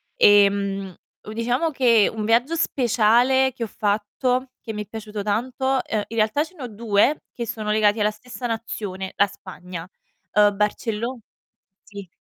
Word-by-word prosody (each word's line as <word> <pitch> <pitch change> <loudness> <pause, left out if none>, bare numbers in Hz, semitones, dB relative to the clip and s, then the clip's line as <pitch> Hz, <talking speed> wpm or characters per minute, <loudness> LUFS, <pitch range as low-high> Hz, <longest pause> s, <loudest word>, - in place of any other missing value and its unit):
ehm, 200 -2 +3 0.3
u 215 - -9
diciamo 245 +8 0
che 235 -6 +4
un 215 -1 -4
viaggio 245 +8 +2
speciale 250 -1 +3
che 240 - -5
ho - - -2
fatto, 245 +6 -1
che 225 - -6
mi 210 - -4
è - - -20
piaciuto 215 -2 -6
tanto 255 +5 -1
ehm, 215 -2 -2
in 230 - -7
realtà 215 +8 +2
ce 350 +3 -13
ne 280 - -9
ho - - -4
2 220 +5 +1
che 235 - -4
sono 215 -1 -3
legati 215 0 +3
alla 210 0 +2
stessa 245 +3 -7
nazione: 205 -4 -5
la 200 - +4
Spagna. 180 -3 -9 0.5
Uhm, 205 -1 +4
Barcello 225 +4 -2 0.6
sì. 200 -2 -10
220 Hz, 160 wpm, -23 LUFS, 205-245 Hz, 0.6 s, che